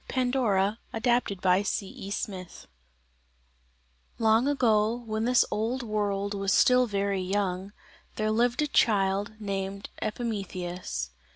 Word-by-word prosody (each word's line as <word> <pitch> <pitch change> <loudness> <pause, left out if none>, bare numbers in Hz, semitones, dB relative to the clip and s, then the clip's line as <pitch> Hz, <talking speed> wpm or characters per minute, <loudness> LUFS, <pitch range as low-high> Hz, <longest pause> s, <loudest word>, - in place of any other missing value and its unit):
PANDORA 235 -5 +1
ADAPTED 225 -4 0
BY 185 +1 +4
C.E. 195 -1 -4
SMITH 190 -2 -5 1.5
Long, 225 +2 +3
long - - +1
ago, 225 -5 +2
when 220 0 -2
this 250 0 +4
old 230 +5 -1
world 205 -2 -1
was 195 -1 -1
still 250 +3 +5
very 200 -2 -1
young, 190 0 -2 0.4
there 215 0 0
lived 240 +5 +2
a - - 0
child 200 -5 +2
named 195 -1 -4
Epimetheus. 185 - -4
205 Hz, 115 wpm, -28 LUFS, 195-230 Hz, 1.5 s, still